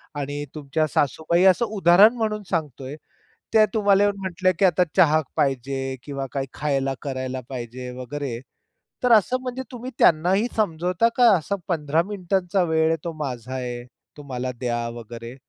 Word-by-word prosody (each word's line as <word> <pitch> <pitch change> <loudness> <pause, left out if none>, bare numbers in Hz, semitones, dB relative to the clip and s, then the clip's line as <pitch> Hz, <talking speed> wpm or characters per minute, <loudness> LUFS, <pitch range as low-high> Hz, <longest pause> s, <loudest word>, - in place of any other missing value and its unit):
आणि 145 0 -4
तुमच्या 150 +1 -1
सासूबाई 160 +5 +1
असं 235 +6 -1
उदाहरण 195 +5 +6
म्हणून 215 -2 -2
सांगतोय, 145 -5 -3 0.6
त्या 215 -1 +6
तुम्हाला 205 -2 +3
येऊन 205 -1 +1
म्हटल्या, 185 0 +1
की 195 - +5
"आता 180 0 +4
चहा 155 0 +5
पाहिजे 135 0 -1
किंवा 140 -2 -5
काय 135 -1 -1
खायला 135 -2 -1
करायला 130 -2 -4
पाहिजे 125 0 -6
वगैरे," 130 -2 -5 0.6
तर 245 - +3
असं 250 +6 -1
म्हणजे 255 0 -5
तुम्ही 250 +1 -7
त्यांनाही 180 +7 +4
समजवता 180 +2 +1
का 240 -3 +7
असा 200 +5 -3
15 160 -2 +1
मिनिटांचा 190 -1 -1
वेळ 160 0 +3
आहे 165 - +1
तो 170 - -4
माझा 125 -2 -5
आहे, 120 -1 -4 0.3
तो 145 - -10
मला 125 +1 -2
द्या 120 -2 -2
वगैरे 115 +1 -9
155 Hz, 155 wpm, -23 LUFS, 135-195 Hz, 0.6 s, का